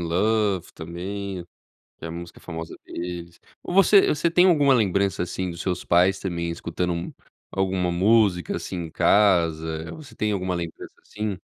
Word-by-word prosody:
Love 100 +1 +1
também, 90 +3 -6 0.5
que - - -9
é - - -3
a - - -6
música 85 +1 -8
famosa 80 -1 -7
deles. 85 -1 -6 0.2
Você 195 +2 +5
você 150 +3 +1
tem 180 +2 +5
alguma 145 -7 +5
lembrança, 100 -5 +1
assim, 90 +1 -3
dos 85 +1 -7
seus 90 -2 -2
pais 90 +3 +3
também 85 -3 -3
escutando 85 +1 -3 0.4
alguma 95 -2 0
música, 95 -1 +3
assim, - - -5
em 80 - -10
casa? 80 -6 +2
Você 155 -3 -13
tem 105 0 0
alguma 90 -2 -1
lembrança, 85 -1 -6
assim? 105 -3 -4
90 Hz, 150 wpm, -24 LUFS, 85-105 Hz, 0.5 s, Você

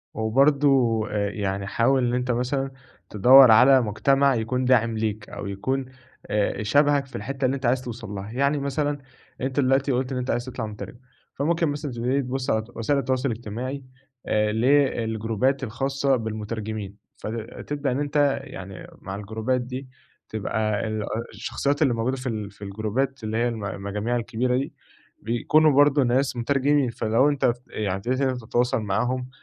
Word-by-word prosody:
وبرضو 130 0 +3
آآ، 100 -1 -1
يعني 100 -1 -3
حاول 130 +4 +2
إن 120 - -1
أنت 125 0 0
مثلًا 135 +3 -1 0.4
تدوَّر 125 +4 +8
على 130 +4 +7
مجتمع 135 +5 +2
يكون 125 +3 -1
داعم 115 -3 +3
ليك، 105 -1 -3
أو 100 - -6
يكون 130 +7 -2 0.4
آآ، 105 0 0
شبهك 145 +5 +3
في 135 - -12
الحتّة 135 0 -3
اللي 130 +1 +1
أنت 135 -1 -5
عايز 125 +1 +2
توصل 120 -3 -7
لها. 100 +1 -6
يعني 140 +4 +1
مثلًا 145 +1 -1 0.4
أنت 130 +2 -1
دلوقتي 135 +1 +2
قُلت 130 +1 -1
إن 130 - -2
أنت 125 - -2
عايز 120 +1 -1
تطلع 130 -3 -5
مترجم، 105 +3 -8 0.4
فممكن 165 +4 +1
مثلًا 145 0 -4
تبتدي 125 +4 0
تبص 130 +1 -3
على 110 0 +1
وسائل 140 +5 +1
التواصل 130 0 0
الاجتماعي 120 +5 -5 0.4
آآ، 105 0 +2
ل 110 +3 0
الجروبات 130 -2 +1
الخاصة 135 +3 0
بالمترجمين، 110 -2 -5 0.2
فتبدأ 135 +5 -4
إن 130 - -1
أنت 145 -1 +1
يعني 95 0 -9
مع 95 0 -6
الجروبات 110 +5 -2
دي 130 +2 -6 0.4
تبقى 110 0 -1
ال 110 -1 -3 0.3
الشخصيّات 140 +4 -2
اللي 135 -5 +4
موجودة 120 +3 -1
في 130 0 -4
ال 105 -3 -4
في 100 +1 -13
الجروبات 110 +6 -2
اللي 110 +1 -2
هي 120 +1 +2
الم 110 -3 -4
المجاميع 100 +4 -3
الكبيرة 125 +1 0
دي، 135 +2 -3 0.5
بيكونوا 150 +8 +3
برضو 145 0 +5
ناس 130 +2 +1
مترجمين 140 +2 +1
فلو 115 +4 +2
أنت 135 -4 +2 0.2
يعني 100 -3 -2
ابتديت 125 +7 -2
إن 135 - +2
أنت 125 -1 -3
تتواصل 120 0 +1
معاهم، 125 +5 -1
125 Hz, 165 wpm, -24 LUFS, 110-135 Hz, 0.5 s, تدوَّر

